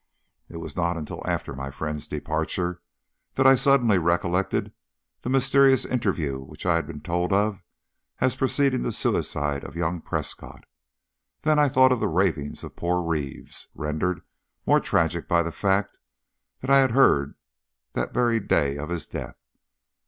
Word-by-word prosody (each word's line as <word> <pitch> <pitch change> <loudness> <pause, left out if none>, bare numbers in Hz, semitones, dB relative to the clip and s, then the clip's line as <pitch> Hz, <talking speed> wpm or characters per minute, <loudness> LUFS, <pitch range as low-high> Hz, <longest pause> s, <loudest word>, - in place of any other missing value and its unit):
It 85 - -8
was 80 -3 -7
not 85 0 0
until 75 -2 -6
after - - -2
my 70 +1 -5
friend's 75 +1 -5
departure 90 -1 -2 0.5
that 135 - +2
I 135 - +9
suddenly 125 -7 +4
recollected 85 +3 0 0.5
the - - -4
mysterious 135 0 +4
interview 85 - -1
which 70 +5 -11
I 85 - +3
had 85 0 0
been 75 - -8
told 90 +3 -1
of 100 0 +1 0.6
as 130 - +1
preceding 135 0 +1
the 120 - -2
suicide 75 -7 -1
of - - -9
young 85 0 -2
Prescott. - - -6 0.8
Then 155 -1 +3
I 145 -1 +4
thought 130 0 +5
of 125 - +2
the - - +1
ravings 80 -4 -1
of - - -9
poor 90 +1 0
Reeves, 75 -5 -4
rendered 75 +4 -2 0.4
more - - +5
tragic - - 0
by 85 0 +3
the 85 - -4
fact 100 +3 0 0.6
that 130 - -2
I 140 - +7
had 130 -3 +3
heard 70 - +4 0.6
that - - -2
very 120 -2 +2
day 70 -8 +1
of 75 +2 -5
his 85 -3 -3
death. - - -7
90 Hz, 160 wpm, -25 LUFS, 80-125 Hz, 0.8 s, I